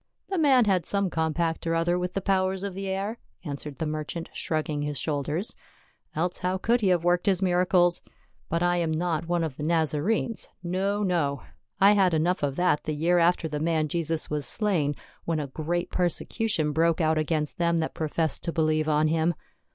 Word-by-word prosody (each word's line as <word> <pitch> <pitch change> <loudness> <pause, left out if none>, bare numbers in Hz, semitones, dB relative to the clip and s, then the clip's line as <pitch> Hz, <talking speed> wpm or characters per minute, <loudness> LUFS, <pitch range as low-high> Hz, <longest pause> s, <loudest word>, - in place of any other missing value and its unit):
" - - -43
The 380 - 0
man 265 -6 +5
had 185 -5 +1
some 200 -2 +1
compact 160 +1 -1
or 165 - +1
other 175 +2 +1
with 180 0 -3
the 195 - 0
powers 190 0 0
of 200 -2 -3
the 195 +1 -5
air," 195 +4 -3 0.3
answered 145 -1 -6
the 160 - -2
merchant 155 +2 -4
shrugging 155 -2 -2
his 145 -1 -3
shoulders, 150 - -2 0.3
" - - -38
else 175 +3 -1
how 185 +1 0
could 235 +5 +1
he 200 - +2
have 180 -3 +2
worked 175 +3 +2
his 190 -1 +4
miracles. 180 -1 +3 0.5
But 170 +1 0
I 175 0 +2
am 170 -2 0
not 165 0 -1
one 175 -1 +1
of 155 -5 -4
the 150 - -5
Nazarenes 165 +8 0
— - - -41 0.2
no, 200 +2 0
no. 150 -8 0 0.4
I 195 +1 +7
had 190 -5 +3
enough 175 +4 +1
of 140 -2 -1
that 175 -3 +1
the 155 - -2
year 170 +4 +2
after 170 -1 +2
the 150 -1 -3
man 160 -1 +1
Jesus 165 0 -1
was 150 -2 -2
slain, 175 -10 0 0.3
when 165 -2 0
a 150 - -2
great 165 +5 -3
persecution 180 -1 0
broke 165 +2 +2
out 160 -1 +2
against 155 0 -1
them 170 -1 +2
that 160 -1 -1
professed 160 -1 -1
to 170 - -1
believe 155 -1 +1
on 150 +1 +3
him. 160 +2 +1
170 Hz, 205 wpm, -26 LUFS, 155-185 Hz, 0.5 s, I